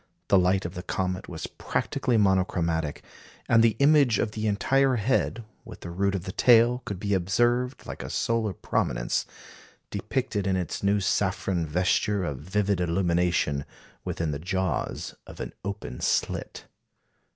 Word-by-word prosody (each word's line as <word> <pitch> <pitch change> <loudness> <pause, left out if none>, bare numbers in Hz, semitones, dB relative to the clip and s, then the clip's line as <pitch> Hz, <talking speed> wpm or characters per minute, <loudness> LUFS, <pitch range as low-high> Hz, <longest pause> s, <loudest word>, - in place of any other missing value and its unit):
The 100 - +6
light 95 +1 +2
of 85 - -4
the 90 - -5
comet 95 0 -3
was 80 -2 -5
practically 125 -3 -1
monochromatic; 90 -6 +1 0.4
and 115 -1 +5
the 115 -1 +4
image 140 -3 +5
of 105 - 0
the 110 0 -2
entire 130 +6 +2
head, 115 0 0 0.2
with - - -11
the 85 - -7
root 100 +3 0
of 90 - -3
the 95 - -5
tail, 120 +3 +5
could 100 -3 -5
be 100 0 -1
observed, 120 +7 +1
like - - -7
a - - -6
solar 115 -2 0
prominence, - - -1 0.6
depicted, 100 -2 -2
in 95 - +2
its 90 -3 -3
new 100 +1 +2
saffron 95 -3 0
vesture 95 +5 +1
of 75 -6 -3
vivid 100 +3 0
illumination, 85 -4 +1 0.4
within 80 -2 -2
the 70 - -4
jaws 95 +2 -2
of - - -11
an - - -5
open 100 -10 -5
slit. - - -1
95 Hz, 150 wpm, -26 LUFS, 90-110 Hz, 0.6 s, The